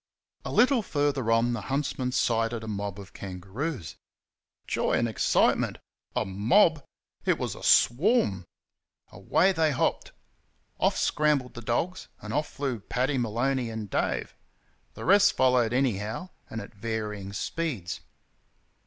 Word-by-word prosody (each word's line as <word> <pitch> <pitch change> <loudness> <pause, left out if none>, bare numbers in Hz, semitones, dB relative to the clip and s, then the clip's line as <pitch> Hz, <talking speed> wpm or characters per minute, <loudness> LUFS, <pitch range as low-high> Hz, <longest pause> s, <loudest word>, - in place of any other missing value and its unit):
A - - -5
little 255 -1 +4
further 145 - 0
on 115 +1 +3
the 120 - -3
huntsmen 135 -2 -2
sighted 115 -2 0
a - - -7
mob 100 -1 -4
of 100 -1 -11
kangaroos. 100 - -5 0.7
Joy - - 0
and 120 - +2
excitement. 110 - +2 0.4
A - - +1
mob? 145 - +3 0.4
It - - +2
was - - -3
a - - -11
swarm! 120 - +3 0.7
Away 190 +4 +2
they 160 -4 +2
hopped. 140 - 0 0.7
Off - - +2
scrambled 150 -4 +1
the 120 - -8
dogs, 140 +11 -2
and 105 +1 -7
off 150 +1 0
flew 135 -5 -3
Paddy 130 +6 -1
Maloney 120 +2 0
and 110 -3 -6
Dave - - -1 0.6
the - - -7
rest 200 +3 +6
followed 125 -3 +3
anyhow, 120 - -1 0.2
and 115 - -5
at 100 - -11
varying 105 -2 -4
speeds. 110 - -3
120 Hz, 135 wpm, -27 LUFS, 105-145 Hz, 0.7 s, rest